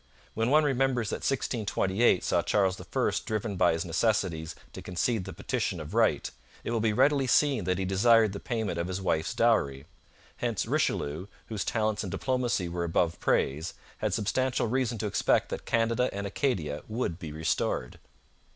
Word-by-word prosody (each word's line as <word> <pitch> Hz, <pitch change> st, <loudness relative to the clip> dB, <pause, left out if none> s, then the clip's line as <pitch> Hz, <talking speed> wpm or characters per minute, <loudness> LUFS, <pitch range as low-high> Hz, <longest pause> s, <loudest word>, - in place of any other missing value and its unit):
When 115 Hz, +2 st, 0 dB
one 155 Hz, +3 st, +5 dB
remembers 135 Hz, -5 st, +1 dB
that -, -, -1 dB
1628 110 Hz, -5 st, +1 dB
saw 85 Hz, -, +2 dB
Charles 95 Hz, 0 st, +1 dB
I -, -, -10 dB, 0.4 s
driven 110 Hz, -1 st, -2 dB
by 90 Hz, -2 st, +4 dB
his 80 Hz, +1 st, -2 dB
necessities 85 Hz, -3 st, 0 dB, 0.2 s
to -, -, -7 dB
concede 95 Hz, +3 st, -1 dB
the 95 Hz, -, -6 dB
Petition 100 Hz, 0 st, -2 dB
of 75 Hz, -1 st, -7 dB
Right, -, -, +2 dB, 0.3 s
it -, -, -3 dB
will 115 Hz, -, +1 dB
be 110 Hz, 0 st, +2 dB
readily 140 Hz, +4 st, +3 dB
seen 135 Hz, -, +3 dB
that 90 Hz, 0 st, +1 dB
he 95 Hz, -, -1 dB
desired 110 Hz, +2 st, +4 dB
the 100 Hz, -, -5 dB
payment 110 Hz, -8 st, -2 dB
of 85 Hz, -, -1 dB
his 95 Hz, +1 st, -3 dB
wife's 80 Hz, -4 st, -1 dB
dowry. 70 Hz, -, +2 dB, 0.5 s
Hence -, -, -1 dB
Richelieu, 75 Hz, +7 st, -1 dB, 0.2 s
whose 110 Hz, -3 st, -2 dB
talents 110 Hz, -2 st, 0 dB
in 95 Hz, -, -4 dB
diplomacy 125 Hz, -4 st, -1 dB
were 85 Hz, 0 st, -3 dB
above 85 Hz, 0 st, 0 dB
praise, 75 Hz, +5 st, 0 dB, 0.2 s
had -, -, 0 dB
substantial 125 Hz, +5 st, 0 dB
reason 120 Hz, 0 st, 0 dB
to 110 Hz, -, -3 dB
expect 105 Hz, -, +1 dB
that -, -, -6 dB
Canada 115 Hz, +2 st, +2 dB
and 100 Hz, 0 st, -4 dB
Acadia 95 Hz, -, -1 dB
would 110 Hz, -7 st, -3 dB
be 80 Hz, -5 st, -6 dB
restored. 75 Hz, -5 st, -2 dB
105 Hz, 170 wpm, -28 LUFS, 85-120 Hz, 0.5 s, one